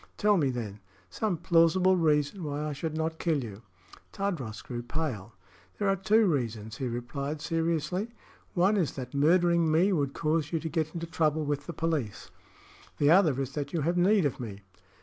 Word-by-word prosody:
Tell 210 0 +4
me, 150 -7 +2
then, 110 -5 -5 0.3
some 210 -6 -1
plausible 170 +3 +4
reason 155 +1 +1
why 145 0 -3
I 150 - -3
should 155 +2 -4
not 160 0 -2
kill 155 -6 0
you." 105 -2 -8 0.5
Tadros 165 - -3
grew 120 -1 -5
pale. 120 -6 -4 0.4
"There 205 - 0
are 195 - +3
two 215 +4 +3
reasons," 115 - -2
he 130 - -2
replied, 140 +5 -4
seriously. 165 +5 -1 0.5
"One 190 +4 +3
is 175 -7 0
that 125 -2 -7
murdering 170 +2 +3
me 180 +6 +3
would 140 -5 -1
cause 155 -1 0
you 165 - 0
to 160 - -4
get 160 0 -2
into 170 0 -3
trouble 160 -2 0
with 145 0 -2
the 170 - -4
police. 155 - -3 0.7
The 145 +1 +4
other 165 -7 +5
is 135 -1 -2
that 145 0 -4
you 165 - 0
have 170 +5 0
need 190 +1 +4
of 140 - -1
me." 105 -5 -7
155 Hz, 185 wpm, -29 LUFS, 140-175 Hz, 0.7 s, other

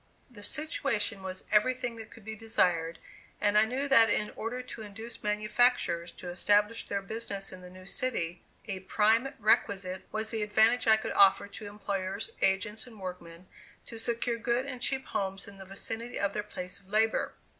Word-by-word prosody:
The 210 -4 -12
situation 230 -7 +1
was 190 0 -6
everything 245 +2 +2
that 225 0 -9
could 220 -3 -15
be 220 0 -5
desired, 175 -7 +1 0.4
and 205 0 +2
I 215 +1 +7
knew 260 +5 -2
that 230 -5 +7
in 210 0 +1
order 245 +3 -4
to 235 - -9
induce 220 +3 -8
manufacturers 210 -4 +2
to 180 - -8
establish 205 +5 +2
their 200 -1 -2
business 200 -2 -4
in 185 -1 -10
the 180 - -10
new 185 0 -13
city, 180 -7 -2 0.3
a 195 -3 -3
prime 220 +7 +2
requisite 195 -3 +1
was 220 0 -2
the 225 -2 -2
advantage 220 +3 +3
I 220 0 +7
could - - -4
offer 195 0 +6
to 210 +1 -8
employers, 200 -1 -3
agents 210 +4 +1
and 225 -4 -13
workmen, 180 -2 -8 0.4
to 230 - -6
secure 235 +1 0
good 240 +2 +1
and 255 -3 -6
cheap 265 +1 +1
homes 195 -1 -3
in 200 -1 -12
the 190 - -9
vicinity 225 +5 -5
of 200 0 0
their 210 - -1
place 185 -2 -7
of 195 -1 -22
labor. 220 +2 +2
210 Hz, 180 wpm, -30 LUFS, 195-230 Hz, 0.4 s, I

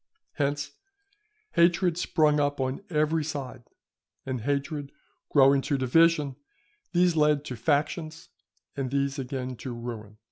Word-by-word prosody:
Hence 145 -1 -2 0.8
hatred 175 0 +3
sprung 155 -3 +2
up 145 -1 0
on 130 +5 -2
every 155 0 +1
side, 135 -5 -6 0.6
and 130 -3 -3
hatred 140 +2 -2 0.4
growing 140 -1 +5
to 140 - -1
division, 145 +1 +3 0.5
these 175 -1 +3
led 150 -1 +3
to 130 - -5
factions, 155 +5 -1 0.5
and 135 -3 -2
these 140 +1 -1
again 130 -1 -4
to 130 - -6
ruin. 110 -3 -7
145 Hz, 120 wpm, -27 LUFS, 130-155 Hz, 0.8 s, growing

